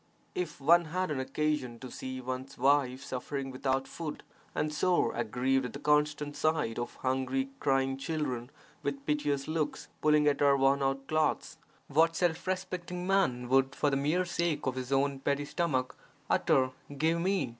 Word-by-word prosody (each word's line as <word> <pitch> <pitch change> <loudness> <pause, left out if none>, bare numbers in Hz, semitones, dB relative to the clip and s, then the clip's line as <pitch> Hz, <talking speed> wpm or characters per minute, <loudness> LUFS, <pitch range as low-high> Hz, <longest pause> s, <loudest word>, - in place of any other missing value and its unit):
If 175 -5 -3
one 170 +5 +5
had 185 +2 -2
an 140 - -1
occasion 140 -3 -1
to 130 0 -9
see 130 0 -5
one's 130 +1 -5
wife 135 0 +2
suffering 135 +1 -4
without 130 +1 -1
food 160 -3 -6 0.3
and 150 0 0
sore 175 +4 +2
aggrieved 125 +3 +1
at - - -11
the 140 - -6
constant 150 0 +1
sight 145 -6 0
of 120 0 -4
hungry 130 +1 0
crying 135 -1 +1
children 135 -4 -3 0.3
with 140 -1 -3
piteous 145 -2 0
looks 155 -2 -2
pulling 150 -1 +4
at 145 -1 +3
her 140 -1 +5
worn 135 +1 +3
out 135 0 0
clothes, 155 0 0 0.3
what 165 +3 +3
self 175 0 0
respecting 180 -1 -3
man 180 -11 +2
would 135 +2 +3
for 145 - +1
the - - +2
mere 155 +7 +1
sake 170 -2 -1
of 130 - +1
his 130 0 -5
own 140 0 +2
petty 140 +1 0
stomach 145 -5 -1 0.4
utter 130 -1 +3 0.3
'give 160 +3 +2
me' 190 -1 +1
(i. 130 - -4
140 Hz, 170 wpm, -31 LUFS, 130-155 Hz, 0.4 s, one